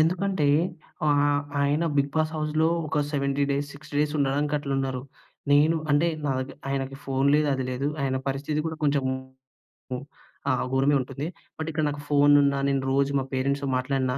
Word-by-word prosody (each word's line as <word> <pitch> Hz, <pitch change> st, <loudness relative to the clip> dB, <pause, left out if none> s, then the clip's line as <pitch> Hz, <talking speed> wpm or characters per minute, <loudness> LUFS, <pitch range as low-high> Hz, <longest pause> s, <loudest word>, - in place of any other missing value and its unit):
ఎందుకంటే 180 Hz, 0 st, +1 dB, 0.6 s
ఆహ్, 145 Hz, -1 st, +3 dB, 0.2 s
ఆయన 145 Hz, +3 st, +2 dB
బిగ్ 140 Hz, 0 st, +2 dB
బాస్ 155 Hz, 0 st, +1 dB
హౌస్‌లో 155 Hz, +1 st, +1 dB, 0.2 s
ఒక 155 Hz, 0 st, -1 dB
70 140 Hz, 0 st, +1 dB, 0.3 s
డేస్, 145 Hz, +1 st, -12 dB
డేస్ 150 Hz, 0 st, +1 dB
ఉండడానికి 145 Hz, +2 st, +1 dB
అట్లున్నారు. 135 Hz, -2 st, -2 dB, 0.5 s
నేను 150 Hz, +3 st, +5 dB
అంటే 145 Hz, +4 st, +4 dB, 0.2 s
నాదగర్ 130 Hz, -1 st, -2 dB
ఆయనకి 135 Hz, 0 st, -2 dB
ఫోన్ 135 Hz, +1 st, +1 dB
లేదు. 150 Hz, 0 st, +3 dB
అది 130 Hz, -, -2 dB
లేదు. 130 Hz, +2 st, -2 dB, 0.2 s
ఆయన 130 Hz, -1 st, 0 dB
పరిస్థితి 140 Hz, +3 st, -2 dB
కూడా 160 Hz, 0 st, -3 dB
కొంచెము 140 Hz, -2 st, +2 dB, 1.4 s
ఆ! -, -, +4 dB, 0.2 s
ఘోరమే 135 Hz, +2 st, +3 dB
ఉంటుంది. 135 Hz, +3 st, -5 dB, 0.3 s
బట్ 160 Hz, -, -4 dB
ఇక్కడ 155 Hz, 0 st, -1 dB
నాకు 145 Hz, 0 st, -5 dB
ఫోనున్నా, 145 Hz, -1 st, +5 dB
నేను 135 Hz, -1 st, +1 dB
రోజు 140 Hz, +1 st, +2 dB
మా -, -, -1 dB
పేరెంట్స్‌తో 140 Hz, +1 st, 0 dB
మాట్లాడినా 130 Hz, 0 st, 0 dB
140 Hz, 150 wpm, -26 LUFS, 135-150 Hz, 1.4 s, నేను